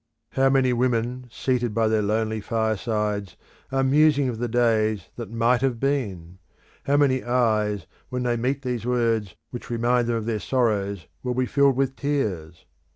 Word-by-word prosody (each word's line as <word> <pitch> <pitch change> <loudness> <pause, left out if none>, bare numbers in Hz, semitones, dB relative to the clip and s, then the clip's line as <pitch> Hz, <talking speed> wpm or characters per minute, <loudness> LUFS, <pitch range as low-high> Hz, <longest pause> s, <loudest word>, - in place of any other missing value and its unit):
How 135 0 +3
many 135 -2 +3
women 125 0 -1
seated 120 -2 -1
by 115 -1 +2
their 110 -1 +2
lonely 110 +1 -1
firesides 105 -2 -1 0.3
are 135 0 +1
musing 145 0 +4
of 115 -2 -5
the 120 - -1
days 110 -4 +1
that 115 -4 -7
might 115 +2 +2
have 130 -4 0
been! 100 -11 -2 0.5
How 140 +1 +2
many 135 -3 +2
eyes 110 -4 +1 0.2
when 125 0 -3
they 120 -1 +1
meet 130 +4 -1
these 125 -4 -2
words 115 -5 0 0.2
which 120 - -8
remind 120 +1 +1
them 120 - 0
of 110 -1 -3
their 110 -2 -1
sorrows 100 - 0 0.2
will 125 -1 -2
be 130 0 +1
filled 140 +1 +3
with 135 0 0
tears! 100 - -3
120 Hz, 165 wpm, -24 LUFS, 110-130 Hz, 0.5 s, musing